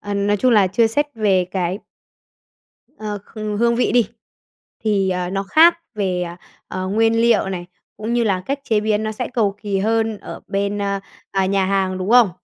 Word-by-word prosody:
ờ, 205 0 -4
nói 200 +1 +1
chung 255 +5 +2
là, 205 -3 +5
chưa 225 +5 +3
xét 290 +7 +1
về 200 -5 +2
cái 185 0 -1 1.2
ờ, 210 -1 -4 0.2
h - - -9 0.2
hương 235 +1 +3
vị 245 -3 +1
đi, 240 -4 +3 0.8
thì, 195 -3 +2
à, 180 0 -2
nó 195 0 -1
khác 330 - +5 0.2
về, 185 -4 -1 0.4
ờ, 185 0 -4
nguyên 225 +3 +2
liệu 230 -4 +3
này, 175 -2 -5 0.3
cũng 220 +2 -4
như 240 -1 +2
là 190 -3 0
cách 275 +1 -1
chế 220 -5 +1
biến 215 0 0
nó 215 0 -2
sẽ 245 +3 -4
cầu 205 -4 +1
kỳ 200 -2 -1
hơn 220 +1 0
ở - - -9
bên, 200 +1 -1
ờ, 200 -1 -1 0.3
à, 195 -1 +1
nhà 195 -1 +1
hàng, 190 -1 0
đúng 185 +4 -3
không? 240 -6 +6
205 Hz, 200 wpm, -20 LUFS, 195-225 Hz, 1.2 s, không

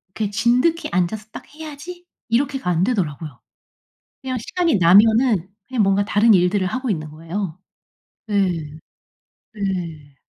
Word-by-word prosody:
이렇게 215 -2 -1
'진득이 245 +10 +1
앉아서 185 +4 -1
딱 - - -9
해야지.' 315 +3 -9 0.2
이렇게가 260 -3 0
안 175 0 +2
되더라고요. 160 - -3 0.8
그냥 260 -2 -3
시간이 335 - 0
나면은 210 +2 +5 0.2
그냥 255 -5 +1
뭔가 195 +1 +2
다른 215 +2 +4
일들을 185 +1 +2
하고 255 +6 -3
있는 155 -6 -3
거예요. 165 +3 -5 0.7
네. 200 -3 +2 1.0
네. 170 -8 -4
205 Hz, 285 characters per minute, -21 LUFS, 180-250 Hz, 1.0 s, 나면은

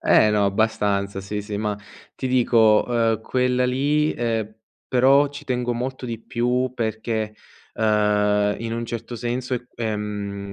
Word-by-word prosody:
Eh, 110 - +5
no, 105 -1 +2
abbastanza, 100 -1 0
sì, 105 +2 -4
sì, 105 0 -5
ma 105 0 -2 0.4
ti 130 - -3
dico, 115 -4 +4
ehM, 115 -2 +1
quella 125 +1 +1
lì, 145 +4 +1
ehM, 110 -2 -2 0.3
però 135 +3 +4
ci 145 - -9
tengo 125 -1 -1
molto 125 +2 -4
di 115 -2 -5
più 125 +2 0
perché, 110 -1 -2 0.4
ehm, 105 -1 +2
in 115 0 -4
un 115 0 -2
certo 115 +1 -5
senso, 125 +2 -2 0.2
ehm, 105 -3 -4
115 Hz, 145 wpm, -23 LUFS, 105-125 Hz, 0.4 s, Eh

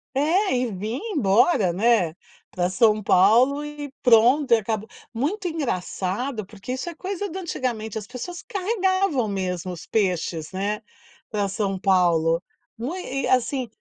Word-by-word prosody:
É, 325 +5 +2
e 245 -2 0
vinha 210 +6 -4 0.2
embora, 210 - +3
né, 200 -4 +3 0.4
pra 180 0 0
São 215 +1 +3
Paulo 235 +10 +4
e 295 -1 -7
pronto. 250 +4 +5
E - - +7
acaba 220 0 -2 0.3
muito 320 - -2
engraçado, 235 - -2
porque 205 +4 -7
isso 260 +6 -4
é 345 - -4
coisa 385 +4 -4
do 365 +3 -5
antigamente. 240 - -3
As 210 - -5
pessoas 265 - -7
carregavam 380 - 0
mesmo 185 -2 -3
os 170 -2 -9
peixes, 175 -6 -1
né, 200 +3 -2 0.5
pra 205 -2 0
São 195 -2 -2
Paulo. 170 -3 +3 0.4
Não 245 +8 -4
é? 275 -7 -4
E, - - 0
assim 255 0 +1
230 Hz, 150 wpm, -24 LUFS, 195-290 Hz, 0.5 s, E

